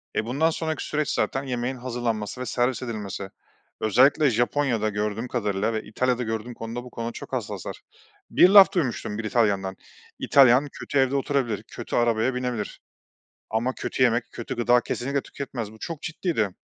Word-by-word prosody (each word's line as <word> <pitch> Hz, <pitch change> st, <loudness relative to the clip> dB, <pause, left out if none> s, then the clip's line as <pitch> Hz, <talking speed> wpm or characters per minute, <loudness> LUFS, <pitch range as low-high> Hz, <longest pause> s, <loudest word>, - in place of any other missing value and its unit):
E, 110 Hz, -, 0 dB
bundan 140 Hz, +8 st, +2 dB
sonraki 160 Hz, -1 st, -3 dB
süreç 150 Hz, -1 st, -1 dB
zaten 135 Hz, -, 0 dB
yemeğin 125 Hz, 0 st, -2 dB
hazırlanması 120 Hz, -2 st, -3 dB
ve -, -, -3 dB
servis 125 Hz, +1 st, 0 dB
edilmesi. 105 Hz, -5 st, -5 dB, 0.5 s
Özellikle 130 Hz, +7 st, +4 dB
Japonya'da 120 Hz, -1 st, +1 dB
gördüğüm 105 Hz, +3 st, -2 dB
kadarıyla 105 Hz, -2 st, -1 dB
ve 110 Hz, -, -2 dB
İtalya'da 125 Hz, +3 st, 0 dB
gördüğüm 115 Hz, +2 st, -4 dB
konuda 115 Hz, +1 st, -6 dB
bu 125 Hz, -, -10 dB
konuda 115 Hz, -1 st, -4 dB
çok -, -, -10 dB
hassaslar. -, -, -4 dB, 0.5 s
Bir 180 Hz, -, +6 dB
laf 200 Hz, -1 st, +9 dB
duymuştum 125 Hz, -, -1 dB
bir 110 Hz, -, -4 dB
İtalyan'dan. 100 Hz, -4 st, +1 dB, 0.4 s
İtalyan 135 Hz, +1 st, +5 dB
kötü 140 Hz, -, -4 dB
evde 130 Hz, +1 st, +2 dB
oturabilir, 135 Hz, -6 st, 0 dB
kötü -, -, -6 dB
arabaya 120 Hz, +1 st, +2 dB
binebilir 125 Hz, -4 st, -3 dB, 0.7 s
ama 115 Hz, +4 st, 0 dB
kötü -, -, -2 dB
yemek, 120 Hz, -1 st, +2 dB
kötü 120 Hz, -, -5 dB
gıda 120 Hz, +1 st, +4 dB
kesinlikle 140 Hz, +4 st, -2 dB
tüketmez. 120 Hz, -6 st, -6 dB
Bu 110 Hz, -, -15 dB
çok 160 Hz, +6 st, -6 dB
ciddiydi. 160 Hz, -, -1 dB
120 Hz, 160 wpm, -25 LUFS, 110-130 Hz, 0.7 s, laf